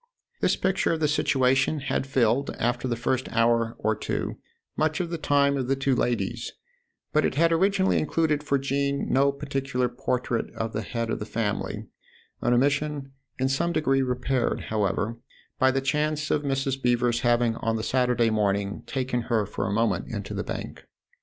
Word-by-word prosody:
This - - +2
picture 190 0 +1
of 160 - -2
the 155 - +2
situation 135 0 +2
had 135 -1 -1
filled, 135 0 +2
after 120 +2 0
the 120 - 0
first 125 +2 -1
hour 115 0 +2
or 110 +1 0
two, - - -3 0.4
much 155 +3 +1
of 175 -2 -2
the 170 - -2
time 140 -1 +3
of 130 -2 -2
the 135 - +2
two 135 -1 +1
ladies, 115 -5 -1 0.6
but - - +3
it - - 0
had 165 +3 +4
originally 190 +3 +3
included 155 -1 +1
for 145 -1 +1
Jean 140 +1 -1
no 140 +1 +4
particular 135 -3 -2
portrait 125 -1 -2
of 115 0 -3
the 110 - -1
head 115 +1 -3
of - - -2
the 105 - -4
family 105 -3 -2 0.6
an 120 - +1
omission 140 +2 +1 0.3
in 130 +1 +1
some 155 +6 0
degree 135 -4 +2
repaired, 125 0 0
however, 110 +2 -1 0.4
by 130 - +5
the 135 +1 +1
chance 150 +2 0
of 150 - +2
Mrs. 135 -1 -1
Beever's 120 -1 +2
having 120 -1 +2
on 115 0 -1
the 110 - -2
Saturday 125 -2 +2
morning 100 -2 0
taken 130 -2 -1
her 110 -3 +2
for - - -3
a - - -2
moment 105 -3 +1
into - - -5
the - - -2
Bank. - - -6
130 Hz, 180 wpm, -26 LUFS, 115-140 Hz, 0.6 s, by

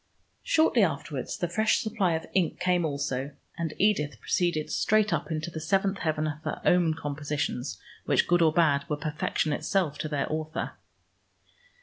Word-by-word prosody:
Shortly 315 -7 +3
afterwards 155 -5 -1
the 175 - -1
fresh 215 +6 +2
supply 210 -6 +1
of 160 0 -2
ink 180 -4 +1
came 180 -1 +2
also, 140 -2 -2 0.2
and 165 -2 -3
Edith 190 -8 +1
proceeded 170 -4 0
straight 215 0 +2
up - - -2
into 155 +1 -3
the 160 - -5
seventh 195 +5 +1
heaven 155 -1 0
of 150 0 -4
her - - -4
own 175 -3 +4
compositions, 145 -3 -3 0.3
which, - - +2
good 175 0 +3
or 160 -1 +5
bad, 155 -4 +3
were 150 - 0
perfection 150 0 -1
itself 155 -1 0
to 155 - -3
their 145 -2 0
author. 155 0 -3
160 Hz, 160 wpm, -28 LUFS, 150-180 Hz, 0.3 s, or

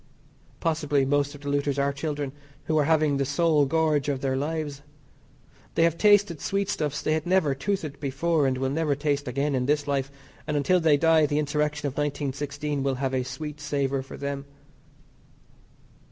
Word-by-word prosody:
Possibly 150 -4 +1
most 145 +1 +1
of 145 - -12
the 145 - -4
looters 145 0 0
are 140 0 +1
children 145 -1 -3 0.3
who 160 - -1
are 145 - +3
having 155 -2 +3
the 140 - +1
sole 145 +1 +2
gorge 155 -1 +1
of 135 -2 -2
their 135 -1 0
lives. 145 0 -3 0.9
They 165 - +4
have 165 -1 +3
tasted 205 -4 +4
sweetstuffs 160 -7 -1
they 155 - +1
had 160 +1 -2
never 180 -6 +3
toothed 155 -1 -3
before, 145 +2 +1
and 130 -1 0
will 130 0 -1
never 150 -1 +1
taste 145 -1 -1
again 140 +3 -1
in 125 -1 0
this 145 0 +1
life, 135 -1 0 0.4
and 150 -1 0
until 180 +6 +3
they 160 -3 +4
die 160 0 +4
the 145 0 -1
insurrection 150 0 -1
of 140 - -1
1916 145 0 -2
will 135 0 0
have 135 0 -2
a 130 - +1
sweet 150 +3 -6
savour 140 -2 -1
for 135 - -10
them. 140 0 -4
145 Hz, 180 wpm, -26 LUFS, 140-155 Hz, 0.9 s, They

